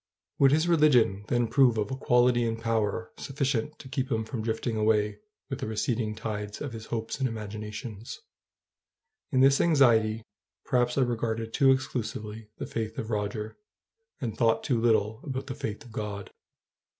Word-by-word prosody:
Would 135 Hz, -1 st, +6 dB
his 155 Hz, +3 st, +3 dB
religion 125 Hz, -, +4 dB
then 120 Hz, -1 st, +1 dB
prove 125 Hz, -1 st, +4 dB
of 105 Hz, +1 st, -1 dB
a -, -, -1 dB
quality 125 Hz, -2 st, +3 dB
and 115 Hz, -1 st, -1 dB
power 115 Hz, -1 st, -1 dB
sufficient 135 Hz, -1 st, -2 dB
to 135 Hz, -, -11 dB
keep 130 Hz, 0 st, -3 dB
him 110 Hz, -2 st, 0 dB
from 115 Hz, 0 st, -4 dB
drifting 110 Hz, +1 st, -2 dB
away 105 Hz, -1 st, +1 dB, 0.3 s
with 135 Hz, -, -5 dB
the -, -, -3 dB
receding 110 Hz, 0 st, -1 dB
tide 105 Hz, -1 st, -5 dB
of 140 Hz, -5 st, -5 dB
his 110 Hz, -1 st, -8 dB
hopes 115 Hz, +1 st, -3 dB
and 135 Hz, -, +2 dB
imaginations? 105 Hz, 0 st, -6 dB, 1.1 s
In 130 Hz, -2 st, +3 dB
this 135 Hz, +1 st, +5 dB
anxiety 115 Hz, -8 st, +4 dB, 0.4 s
perhaps 125 Hz, 0 st, +1 dB
I -, -, +4 dB
regarded 115 Hz, -2 st, -1 dB
too 135 Hz, -2 st, +4 dB
exclusively 110 Hz, -4 st, -3 dB
the -, -, -4 dB
faith 110 Hz, -1 st, -4 dB
of 110 Hz, -, -4 dB
Roger, 105 Hz, +1 st, -3 dB, 0.6 s
and 110 Hz, -4 st, -3 dB
thought 115 Hz, -1 st, +2 dB
too 120 Hz, -4 st, +1 dB
little 110 Hz, -1 st, +2 dB
about 130 Hz, -1 st, -4 dB
the 135 Hz, -, -5 dB
faith 110 Hz, +4 st, -5 dB
of 120 Hz, -, -13 dB
God. 105 Hz, -2 st, -5 dB
115 Hz, 165 wpm, -28 LUFS, 110-130 Hz, 1.1 s, Would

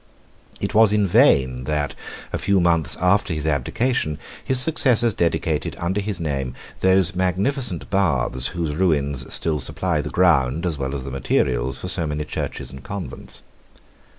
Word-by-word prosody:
It -, -, -3 dB
was 110 Hz, -1 st, +6 dB
in 105 Hz, -1 st, +2 dB
vain 65 Hz, -8 st, +3 dB
that, 75 Hz, -3 st, -1 dB, 0.4 s
a -, -, -1 dB
few 100 Hz, 0 st, +2 dB
months 85 Hz, -4 st, +3 dB
after 90 Hz, -1 st, +2 dB
his 75 Hz, 0 st, -4 dB
abdication, 75 Hz, -, -1 dB, 0.3 s
his 130 Hz, -1 st, +2 dB
successors 125 Hz, -6 st, +3 dB
dedicated, 80 Hz, -3 st, -1 dB
under 95 Hz, +4 st, -2 dB
his 100 Hz, -2 st, -4 dB
name, 70 Hz, -5 st, -3 dB, 0.2 s
those 95 Hz, -1 st, +3 dB
magnificent 95 Hz, -, -1 dB
baths, 65 Hz, -10 st, +2 dB
whose 85 Hz, -4 st, -3 dB
ruins 70 Hz, -6 st, 0 dB
still 80 Hz, -2 st, 0 dB
supply 80 Hz, +1 st, -2 dB
the 75 Hz, -, -6 dB
ground 80 Hz, -3 st, +2 dB
as 80 Hz, -5 st, -2 dB
well 65 Hz, +1 st, -3 dB
as 65 Hz, -, -4 dB
the 70 Hz, -, -7 dB
materials 65 Hz, -1 st, 0 dB
for -, -, -7 dB
so 85 Hz, -3 st, -1 dB
many 75 Hz, 0 st, -3 dB
churches 75 Hz, -, -5 dB
and 65 Hz, 0 st, -11 dB
convents. 100 Hz, -2 st, -7 dB
80 Hz, 155 wpm, -22 LUFS, 70-95 Hz, 0.4 s, was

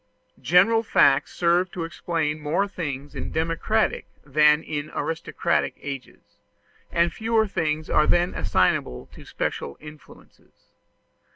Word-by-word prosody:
General 195 Hz, +7 st, +4 dB
facts 145 Hz, -10 st, +3 dB
serve 175 Hz, +1 st, +2 dB
to 175 Hz, -, -4 dB
explain 165 Hz, -2 st, -2 dB
more 155 Hz, +7 st, 0 dB
things 145 Hz, -7 st, -6 dB
in 140 Hz, -, -6 dB
democratic 165 Hz, +7 st, 0 dB, 0.2 s
than 150 Hz, +2 st, +4 dB
in 150 Hz, -1 st, -4 dB
aristocratic 170 Hz, +1 st, -1 dB
ages, 135 Hz, -3 st, -9 dB, 0.5 s
and 170 Hz, 0 st, +1 dB
fewer 225 Hz, 0 st, +1 dB
things 155 Hz, -5 st, -2 dB
are 150 Hz, -, +3 dB
then 175 Hz, +1 st, +2 dB
assignable 60 Hz, -, 0 dB
to -, -, -13 dB
special 70 Hz, -, -4 dB
influences. 150 Hz, 0 st, -16 dB
160 Hz, 115 wpm, -24 LUFS, 150-180 Hz, 0.5 s, General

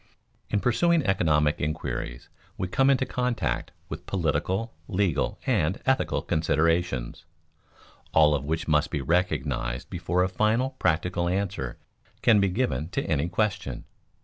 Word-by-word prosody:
In 105 Hz, -, 0 dB
pursuing 165 Hz, +6 st, +2 dB
economic 75 Hz, -6 st, +2 dB
inquiries 75 Hz, -5 st, -3 dB, 0.3 s
we 90 Hz, -, -2 dB
come 135 Hz, +9 st, +3 dB
into 135 Hz, -1 st, +3 dB
contact 125 Hz, -3 st, -1 dB, 0.2 s
with -, -, -8 dB
political, 95 Hz, +5 st, -1 dB
legal, 90 Hz, -6 st, 0 dB
and 100 Hz, -7 st, +1 dB
ethical 130 Hz, 0 st, +1 dB
considerations, 80 Hz, -3 st, 0 dB, 0.9 s
all 75 Hz, -1 st, +5 dB
of 70 Hz, -2 st, -1 dB
which 80 Hz, +3 st, -2 dB
must 75 Hz, +1 st, +2 dB
be 75 Hz, -, -2 dB
recognized 70 Hz, -7 st, -1 dB
before 90 Hz, +2 st, 0 dB
a -, -, +2 dB
final 110 Hz, +7 st, +1 dB
practical 85 Hz, +1 st, +1 dB
answer 90 Hz, -9 st, -2 dB, 0.5 s
can 110 Hz, -3 st, +6 dB
be 100 Hz, -1 st, +3 dB
given 90 Hz, -, -1 dB
to 135 Hz, +8 st, -2 dB
any 80 Hz, -2 st, 0 dB
question. 95 Hz, -, -1 dB
90 Hz, 130 wpm, -26 LUFS, 75-105 Hz, 0.9 s, can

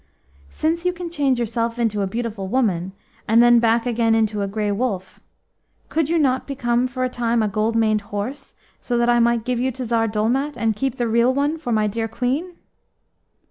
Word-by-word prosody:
"Since 330 Hz, +2 st, -1 dB
you 360 Hz, 0 st, +1 dB
can 350 Hz, -1 st, -7 dB
change 275 Hz, -6 st, +1 dB
yourself 230 Hz, 0 st, -2 dB
into 220 Hz, -3 st, 0 dB
a 195 Hz, -, 0 dB
beautiful 220 Hz, -2 st, -4 dB
woman, 190 Hz, -6 st, 0 dB, 0.3 s
and 225 Hz, +2 st, +4 dB
then 240 Hz, 0 st, +6 dB
back 230 Hz, 0 st, +2 dB
again 230 Hz, -2 st, +2 dB
into 215 Hz, -2 st, +1 dB
a 200 Hz, -, -1 dB
Grey 205 Hz, +1 st, -2 dB
Wolf, 200 Hz, -4 st, -3 dB, 0.7 s
could 320 Hz, -2 st, 0 dB
you 335 Hz, -, +2 dB
not 265 Hz, -4 st, +1 dB
become 245 Hz, -2 st, 0 dB
for 255 Hz, +1 st, -4 dB
a -, -, +2 dB
time 235 Hz, -2 st, 0 dB
a -, -, +1 dB
gold 215 Hz, +3 st, -1 dB
maned 215 Hz, -2 st, +2 dB
horse, 255 Hz, +8 st, -5 dB, 0.2 s
so 240 Hz, -, -2 dB
that 240 Hz, 0 st, +3 dB
I 240 Hz, -, +3 dB
might 235 Hz, -1 st, +2 dB
give 250 Hz, -2 st, -1 dB
you 255 Hz, +2 st, +1 dB
to 255 Hz, +1 st, -5 dB
Tsar 225 Hz, -1 st, +1 dB
Dolmat, 240 Hz, +7 st, -1 dB
and 225 Hz, -1 st, 0 dB
keep 265 Hz, +3 st, -2 dB
the 240 Hz, -2 st, 0 dB
real 235 Hz, +2 st, +3 dB
one 285 Hz, +4 st, 0 dB
for 285 Hz, -6 st, -4 dB
my 215 Hz, -1 st, +2 dB
dear 225 Hz, +2 st, -2 dB
Queen?" 270 Hz, +10 st, -2 dB
235 Hz, 205 wpm, -21 LUFS, 220-255 Hz, 0.7 s, then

